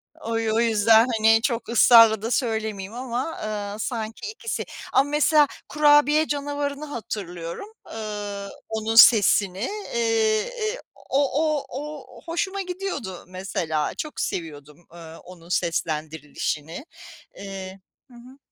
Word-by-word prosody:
O 230 0 -4
y 225 -1 -1
o 225 - +2
yüzden 225 0 +4
hani 225 +1 +5
çok 235 -2 -2
ısrarla 230 -2 +7
da 230 +2 -3
söylemeyeyim 220 -5 -2
ama, 250 +5 -4
ııı, 210 -1 -4
sanki 225 - -4
ikisi. 455 0 -5 0.3
Ama 275 +2 +3
mesela 295 0 +4 0.2
kurabiye 295 +1 +4
canavarını 285 0 -3
hatırlıyorum, 200 - -6 0.2
ııı, 205 -2 -5 0.2
onun 220 0 -2
sesini, 200 -4 +6 0.4
eee, 225 -2 +2
eee, 480 -1 -4 0.3
o 275 - +2 0.2
o 305 -3 0
o 295 0 -8
hoşuma 380 +4 -2
gidiyordu 360 - -5
mesela, 185 -5 -3
çok 305 - -6
seviyordum, 150 -1 -6
ııı, 165 -1 -11
onun 175 -1 -14
seslendirilişini. 160 - -3 0.5
Eee, 195 -1 -8 0.3
hı - - -17
hı. 250 +3 -15
225 Hz, 120 wpm, -24 LUFS, 190-285 Hz, 0.5 s, ısrarla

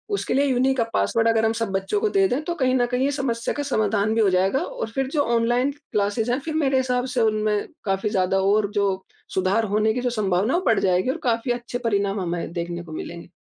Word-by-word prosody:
उसके - - -2
लिए 280 +1 +3
unique 260 0 +1
password 230 0 +1
अगर 225 0 +2
हम 220 - +2
सब 225 -3 -2
बच्चों 195 - -1
को 435 - +2
दे 390 -1 +3
दें, 270 +5 0
तो 345 +2 -3
कहीं 260 -4 +1
न 245 -1 +3
कहीं 250 +2 0
ये 285 - +1
समस्या 250 -5 -2
का 290 - -2
समाधान 215 -4 +1
भी 225 - +3
हो 200 - +4
जाएगा 190 +8 +2
और - - -5
फिर 270 +2 -1
जो 290 - +3
ऑनलाइन 240 +4 +2
क्लासेस 225 -5 -2
हैं, 250 - +1
फिर 310 +2 -5
मेरे 275 -4 +2
हिसाब 250 -1 0
से 240 - +2
उनमें 215 -1 +1 0.2
काफ़ी 195 +2 0
ज़्यादा 190 -2 +1
और 205 +1 +2
जो 195 -2 0 0.3
सुधार 190 +4 +2
होने 215 +1 +2
की 250 - -2
जो 250 - 0
संभावना 205 0 0
है, 350 - +3
वो - - -9
बढ़ 225 - +3
जाएगी 185 +5 +1
और - - -4
काफ़ी 235 0 0
अच्छे 240 0 -3
परिणाम 200 -4 0
हमें 170 -1 -3
देखने 170 0 -4
को 160 - -12
मिलेंगे। 170 +2 -7
225 Hz, 240 wpm, -23 LUFS, 200-260 Hz, 0.3 s, हो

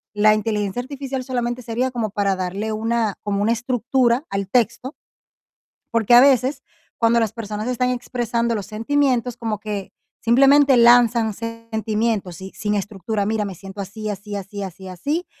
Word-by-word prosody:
la 215 +1 +5
inteligencia 210 0 -1
artificial 270 -1 -5
solamente 245 -1 -2
sería 245 +2 -2
como 230 -4 -2
para 200 -1 0
darle 190 +4 -3
una, 225 -1 0
como 205 -1 -1
una 225 - +2
estructura 245 +2 +1
al 195 -1 -2
texto, 240 - 0 1.0
porque 230 0 +3
a 240 - +10
veces 265 0 +3 0.4
cuando 235 0 +3
las 220 -2 0
personas 215 0 -5
están 250 0 0
expresando 235 -2 -1
los 200 - -5
sentimientos, 245 +1 0
como 220 -3 -3
que 205 -3 -5 0.3
simplemente 275 +3 +5
lanzan 235 -2 +5
sentimientos 220 -4 -3
y 190 - -8
sin 210 0 -2
estructura: 205 +1 -2
mira, 215 0 0
me 195 -2 -5
siento 195 +3 -9
así, 215 +2 -6
así, 205 +1 -6
así, 200 +1 -6
así, 190 0 -9
así. 290 - -3
225 Hz, 155 wpm, -21 LUFS, 205-245 Hz, 1.0 s, a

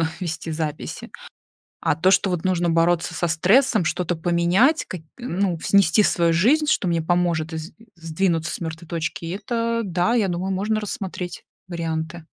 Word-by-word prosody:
сложно 160 - +1
вести 165 -2 -4
записи. 155 -1 -5 0.7
А - - +1
то, 185 +5 +3
что, 190 +1 +3
вот, 180 -2 -2
нужно 175 -2 +1
бороться 165 +1 +2
со 175 - 0
стрессом, 190 - +3
что-то 175 +1 -1
поменять, 175 - +2
какь 175 -4 -7
ну, 195 -7 -2
снести 200 +1 +4
свою 170 -4 +2
жизнь, 270 - +3
что 205 - +1
мне 170 -1 +1
поможет 170 -1 0
из 160 +3 -6 0.2
сдвинуться 165 0 -1
с - - -6
мертвой 165 0 -6
точки, 165 +1 -4
это 230 +2 -1
да, 180 +2 0
я 220 -5 +2
думаю, 180 +2 -2
можно 210 +3 0
рассмотреть 190 -3 -5 0.2
варианты. 165 -1 -4
175 Hz, 160 wpm, -22 LUFS, 165-195 Hz, 0.7 s, снести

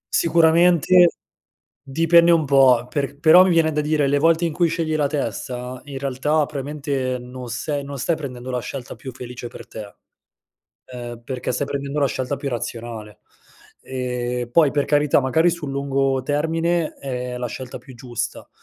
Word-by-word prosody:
Sicuramente 170 +1 +5 0.7
dipende 165 +4 +4
un 165 -2 +4
po', 130 -3 +5
per 140 +1 -3
però 165 +4 +8
mi 185 - +2
viene 165 -2 +3
da 150 0 0
dire: 150 -1 +1
le 140 +1 +2
volte 165 +2 +3
in 165 - -2
cui 170 +1 +2
scegli 160 -1 -1
la 150 -2 +1
testa, 125 -3 -4
in 140 -2 -7
realtà 140 +3 0
probabilmente 140 -2 -3
non 125 0 -9
sei 145 +4 -3
non 140 0 -7
stai 160 +6 0
prendendo 130 -4 -7
la 125 - -1
scelta 125 +1 -7
più 130 - -8
felice 125 -1 -8
per - - -11
te. 105 -2 -9 0.9
Ehm, 120 -2 -8
perché 130 -1 -4
stai 135 +3 -1
prendendo 140 +1 -4
la 140 - +3
scelta 130 +1 -3
più 140 - -4
razionale. 115 -3 -6 0.6
Ehm, 125 -1 -3
poi 155 -2 +5
per 145 0 0
carità, 145 -1 +3
magari 160 +6 +2
sul 165 -4 -5
lungo 135 -1 0
termine 165 +3 0
è 125 -2 -5
la 125 0 -3
scelta 125 +3 -7
più 135 -5 -14
giusta, 120 -2 -5
140 Hz, 170 wpm, -21 LUFS, 125-155 Hz, 0.9 s, però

